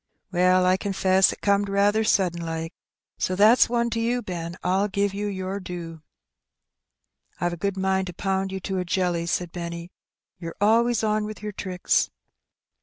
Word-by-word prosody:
" - - -52
Well, 180 0 +3
I 185 +1 +4
confess 190 -1 +3
it - - -10
corned 200 0 +2
raather 205 +2 +2
sudden 180 -5 +1
like; 165 0 -4 0.5
so 185 - 0
thaf 210 +3 +7
s - - +5
one 235 0 0
to 230 - -1
you, 240 +1 0
Ben. 170 -2 -5
I'll 190 +3 +2
give 200 0 -1
you 205 +1 -3
yer 190 0 -4
due." 170 -3 -7 0.7
" 60 0 -43
I've 175 0 0
a - - -3
good 200 +2 -2
mind 190 0 0
to 180 - -6
pound 190 +1 -1
you 190 - -4
to 190 0 -2
a - - -1
jelly/' 175 -1 -1
said 175 0 -1
Benny. 170 0 -6 0.5
"Yer 165 -2 -7
always 225 +2 +3
on 215 0 +1
with 215 0 -8
yer 210 - -3
tricks." 185 -2 0
190 Hz, 185 wpm, -25 LUFS, 175-205 Hz, 0.7 s, thaf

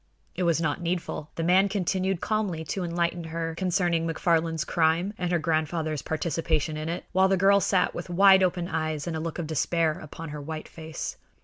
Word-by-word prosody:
It - - -5
was 170 -2 +2
not 155 +1 -1
needful. 170 -3 -3
The 165 - -2
man 185 +4 +4
continued 190 -1 -1
calmly 205 -6 -1
to 185 +4 -3
enlighten 170 0 -1
her 165 0 -3
concerning 175 -2 0
McFarland's 165 -1 +1
crime 170 +4 +1
and 180 -2 -2
her 175 - +3
grandfather's 155 -2 -1
participation 160 0 -1
in 155 +1 -4
it, 170 - -4
while 190 +1 +4
the 190 0 +2
girl 200 +2 +5
sat 190 -2 +2
with 175 +1 -6
wide 190 +2 +6
open 180 -1 +1
eyes 155 -3 -2
and 170 -2 -3
a - - -2
look 165 0 -4
of 170 - -3
despair 160 +1 0
upon 160 +1 -8
her 150 0 -6
white 155 +1 -6
face. 160 -1 -6
170 Hz, 195 wpm, -27 LUFS, 160-180 Hz, -, wide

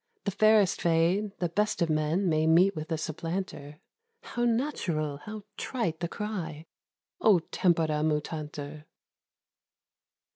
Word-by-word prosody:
The 200 - -1
fairest 215 -1 +4
fade; 175 +5 +2
the 175 - 0
best 210 +5 0
of - - +1
men 155 +5 +1
May 155 -1 +2
meet 175 +4 +5
with 155 +2 -6
a 160 - +1
supplanter;— 160 -2 -5 0.4
How 240 0 -2
natural, 185 - -1
how 215 -1 -7
trite 170 -11 -2
the 170 - -1
cry, 170 -6 -5 0.6
"O 210 - +6
tempora 160 -2 +1
mutantur!" 150 -1 -3
165 Hz, 120 wpm, -29 LUFS, 155-200 Hz, 0.6 s, O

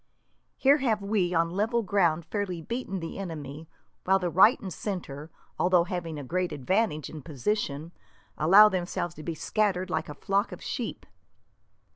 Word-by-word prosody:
Here 275 +2 +5
have 225 -7 0
we, 200 -3 +1
on 165 0 +2
level 225 +5 0
ground, 170 -5 +1
fairly 200 -5 -3
beaten 195 0 -4
the 165 +3 -6
enemy, 155 -4 -7 0.3
while 190 +1 +4
the 180 -2 -2
right 205 +8 +6
and 190 -3 -6
centre, 160 -7 -5 0.3
although 180 -1 +4
having 175 -4 -4
a 145 - -6
great 180 +6 -1
advantage 155 - 0
in 155 - -8
position, 155 - -3 0.4
allow 195 +7 +7
themselves 175 -3 -2
to 155 - -10
be 165 +1 -4
scattered 190 0 0
like 160 0 -2
a 150 - -7
flock 200 +7 0
of - - -8
sheep." - - -5
180 Hz, 160 wpm, -28 LUFS, 160-200 Hz, 0.4 s, allow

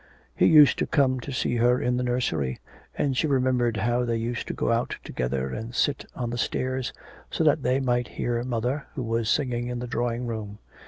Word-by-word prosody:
He - - +4
used 150 -3 +7
to - - 0
come 130 -3 +2
to 140 - -7
see 120 -2 0
her 125 +2 +3
in 125 - 0
the - - 0
nursery, 80 - -1 0.4
and 135 -2 0
she 155 - +1
remembered 125 -4 +1
how 120 +4 +1
they 120 -1 0
used 115 +1 -3
to - - -3
go - - 0
out 115 +1 0
together 65 +1 -2
and 115 +2 -6
sit 140 0 +1
on 120 -2 -3
the 120 - -3
stairs, 130 +1 -1 0.4
so - - -1
that 150 -1 +3
they 130 +1 +1
might 125 -2 0
hear 120 -1 0
mother, 125 +4 -2
who 130 - -3
was 115 -1 -1
singing 120 -4 0
in 125 0 -3
the 120 - -4
drawing 120 0 -2
room. 110 -3 -5
120 Hz, 210 wpm, -26 LUFS, 115-130 Hz, 0.4 s, used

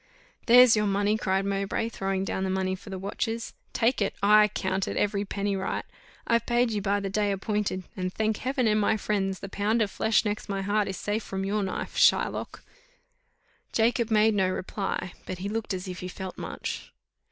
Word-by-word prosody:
"There's 245 0 +8
your 210 -1 +1
money," 200 +1 +2
cried 195 -2 0
Mowbray, 200 +3 -1
throwing 195 -3 -2
down 190 - -2
the 190 - -1
money 190 0 0
for 190 +2 -9
the 190 - -4
watches 225 +4 -3 0.2
"take 230 +1 +1
it 200 - 0
ay, 210 +1 +6
count 190 0 -1
it - - -3
every 200 -1 +1
penny 200 0 -2
right 190 0 -2 0.4
I've 230 -1 +1
paid 240 0 +2
you 210 -2 -1
by 200 +1 +1
the 200 - -3
day 205 0 +1
appointed; 195 -1 -1
and, 185 0 -2
thank 220 +2 0
Heaven 260 0 -1
and 215 -1 +3
my 220 +2 +2
friends, 195 -2 -1
the - - -5
pound 210 +4 0
of 210 -3 +1
flesh 220 +1 +2
next 210 0 -3
my 195 -1 -2
heart 205 +1 +1
is 190 - -4
safe 210 +2 -2
from 195 -2 -4
your 205 +2 0
knife, 190 -2 -4
Shylock!" - - +2 1.1
Jacob 235 0 +2
made 220 0 +4
no 190 -2 +2
reply, 185 -1 -3
but 185 - -4
he 190 +3 -4
looked 220 +1 -3
as 185 0 -3
if 180 -1 -6
he 180 - -5
felt 185 0 -7
much. - - -6
205 Hz, 200 wpm, -27 LUFS, 190-215 Hz, 1.1 s, There's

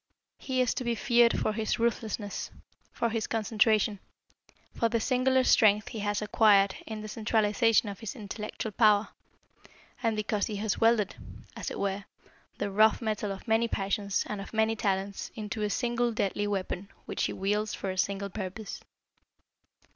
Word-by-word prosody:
He 260 -1 0
is 250 - +2
to - - -3
be 235 -1 0
feared 235 0 +4
for 215 - 0
his 220 0 -1
ruthlessness, 225 -3 -2 0.4
for 235 - -1
his 225 -1 -1
concentration, 215 -1 +2 0.7
for 230 - +1
the 230 0 +1
singular 260 +2 +2
strength 210 -4 +4
he 225 - -6
has 205 0 -1
acquired 205 -2 +4
in 220 -1 -5
the 215 - -6
centralization 220 +1 +2
of 200 -1 -6
his 225 -3 -6
intellectual 215 0 -5
power, 210 -1 +4 0.9
and 225 -2 +1
because 210 -1 -1
he 215 - -4
has 205 0 -1
welded, 225 -3 +3 0.4
as - - -4
it - - -6
were, 200 0 -2 0.5
the 200 - -2
rough 215 +2 +4
metal 215 -3 -2
of 195 +4 -8
many 225 +1 +3
passions 200 -1 -1
and 210 -2 -4
of 200 - -9
many 220 0 +2
talents 195 -1 -2
into 215 0 -5
a 210 - 0
single 240 +1 0
deadly 205 -1 -1
weapon 195 -1 -3 0.2
which - - -2
he - - -2
wields 210 +2 -1
for 190 - -3
a - - -5
single 200 0 -1
purpose. 205 +1 -6
215 Hz, 165 wpm, -29 LUFS, 200-225 Hz, 0.9 s, feared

